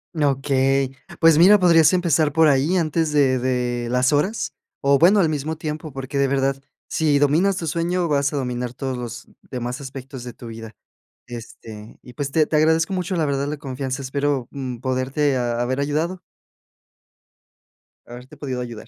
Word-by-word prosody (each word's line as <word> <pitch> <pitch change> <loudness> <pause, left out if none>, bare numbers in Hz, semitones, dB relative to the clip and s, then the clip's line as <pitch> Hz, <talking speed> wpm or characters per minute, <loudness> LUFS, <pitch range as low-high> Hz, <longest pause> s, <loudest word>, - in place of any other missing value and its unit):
Okey. 135 -2 +1 0.2
Pues 165 -2 +5
mira, 195 +5 +8
podrías 165 -4 +5
empezar 165 -4 +2
por 160 0 +5
ahí 145 +6 +2
antes 160 -2 0
de 135 -3 +3
de 125 -1 -1
las 125 +3 +2
horas, 190 +10 0 0.3
o 140 0 +3
bueno 190 +5 +5
al 175 - +4
mismo 155 +1 -2
tiempo 155 0 -5
porque 135 +1 -4
de 140 - +3
verdad 135 0 0 0.3
si 150 -3 +1
dominas 160 +7 +2
tu 165 - -4
sueño 170 +2 -1
vas 140 -2 +1
a - - -5
dominar 125 -2 -3
todos 130 0 -3
los 120 -2 -7 0.2
demás 125 +2 -4
aspectos 130 -1 -8
de 125 -1 -8
tu 120 - -11
vida. 115 -2 -9 0.5
Este, 110 -2 -10
y 125 - -14
pues, 140 0 -4
te 155 0 +2
te - - -1
agradezco 160 +3 +3
mucho 185 0 -2
la 165 -3 +1
verdad 140 -1 -1
la 150 +1 -3
confianza, 135 -1 -4
espero, 140 -1 -1
mm, 130 -3 -5
poderte 130 +2 0
ha 120 -1 -1
haber 130 +2 -1
ayudado. 155 +6 -1 1.8
Haberte 125 +2 -12
podido 130 -3 -4
ayudar. 115 -2 -8
140 Hz, 170 wpm, -22 LUFS, 130-155 Hz, 1.8 s, mira